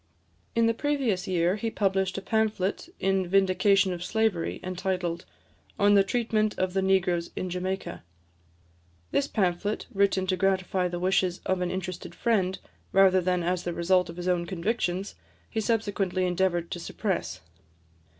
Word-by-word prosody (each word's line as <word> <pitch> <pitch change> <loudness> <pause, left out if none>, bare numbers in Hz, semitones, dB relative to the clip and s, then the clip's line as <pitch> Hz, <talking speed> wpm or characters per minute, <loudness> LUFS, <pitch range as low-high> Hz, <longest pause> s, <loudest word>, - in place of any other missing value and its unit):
In 230 - +4
the 230 - +3
previous 240 -8 -1
year, 180 +1 +1
he 225 +1 -2
published 195 -3 0
a 195 - -5
pamphlet 215 - 0
in 195 -1 +1
vindication 195 0 +3
of 175 0 -5
slavery, 215 -3 0
entitled, 185 -2 -2 0.5
"On 205 -1 +4
the 200 -1 +6
Treatment 215 0 0
of 185 -1 -1
the 190 - +1
Negroes 180 -3 +1
in 185 - -3
Jamaica." 185 +2 -3 1.1
This 280 - +1
pamphlet, 200 -1 -1
written 195 -1 +2
to 185 0 +1
gratify 185 -1 +1
the 175 0 -4
wishes 185 0 +1
of 190 -1 0
an 180 - 0
interested 185 -1 -5
friend, 190 -5 +1 0.3
rather 190 -1 +5
than 180 0 0
as 180 +1 -1
the 175 - -3
result 180 +2 +2
of 170 - -8
his 180 0 -4
own 175 -1 +1
convictions, 190 +1 -2 0.4
he 220 - -1
subsequently 205 -4 0
endeavoured 175 -1 0
to 175 - -3
suppress. 185 - -3
190 Hz, 150 wpm, -27 LUFS, 180-200 Hz, 1.1 s, the